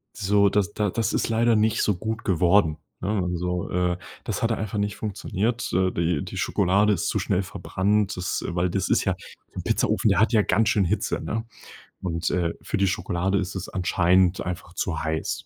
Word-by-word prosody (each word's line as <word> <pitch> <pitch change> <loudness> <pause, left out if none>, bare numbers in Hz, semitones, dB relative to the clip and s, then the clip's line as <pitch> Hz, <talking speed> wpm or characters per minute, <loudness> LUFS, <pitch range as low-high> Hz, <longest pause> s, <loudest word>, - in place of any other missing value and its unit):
So, 100 -1 +3
das 100 0 0
da 105 -3 0
das 115 +2 0
ist - - +1
leider 115 +1 +3
nicht 110 +1 +2
so 105 - +2
gut 110 +4 -4
geworden, 85 -2 +3 0.2
ne? 95 - -2
Also, 90 0 -2
äh, 90 0 +1 0.3
das 105 -1 -3
hatte 115 0 +2
einfach 105 -1 -4
nicht 100 -1 -1
funktioniert 110 +2 -2
äh, 95 +1 +3
die 85 -3 0
die - - -7
Schokolade 100 +4 +2
ist - - -1
zu - - 0
schnell 90 - 0
verbrannt, 100 +2 0
das 90 -1 -2
weil 90 +1 0
das 95 +1 -1
ist - - +2
ja - - +1 0.4
'n - - -4
Pizzaofen, 110 - +1
der 95 - +3
hat 110 +3 +4
ja 110 -3 +4
ganz 110 +4 +2
schön 100 -3 +2
Hitze, 105 +5 -1
ne? 115 +1 -3 0.6
Und, 85 -2 -1
äh, 85 -2 0
für - - -3
die 100 -1 +2
Schokolade 90 +2 0
ist 90 -3 -2
es 95 - -5
anscheinend 90 -1 +2
einfach 90 -1 -5
zu 85 -2 -2
heiß. 80 0 -2
95 Hz, 200 wpm, -25 LUFS, 90-105 Hz, 0.6 s, hat